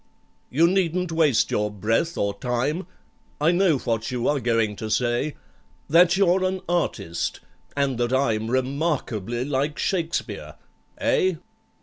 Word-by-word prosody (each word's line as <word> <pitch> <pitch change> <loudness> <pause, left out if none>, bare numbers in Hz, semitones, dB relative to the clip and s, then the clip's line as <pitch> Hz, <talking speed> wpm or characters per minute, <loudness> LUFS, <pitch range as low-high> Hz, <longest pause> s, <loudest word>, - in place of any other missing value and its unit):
"You 160 +6 +3
needn't 180 -1 0
waste 155 -7 +2
your 105 0 +1
breath 115 - -1
or 100 0 0
time,— 135 +9 -1 0.5
I 155 +3 +4
know 175 -4 +3
what 115 -2 -2
you 125 -2 -1
are 145 -1 +2
going 115 -3 +1
to 110 - -5
say,— 120 +6 0 0.5
That 175 +3 +5
you're 190 -1 +3
an 185 0 -1
artist, 100 - -1 0.4
and 135 -4 0
that 120 0 0
I'm 115 -5 +1
Remarkably 130 - -1
like 145 +1 -1
SHAKESPEARE. 170 -3 -2 0.4
Eh? 415 -7 +2
140 Hz, 130 wpm, -24 LUFS, 120-170 Hz, 0.5 s, That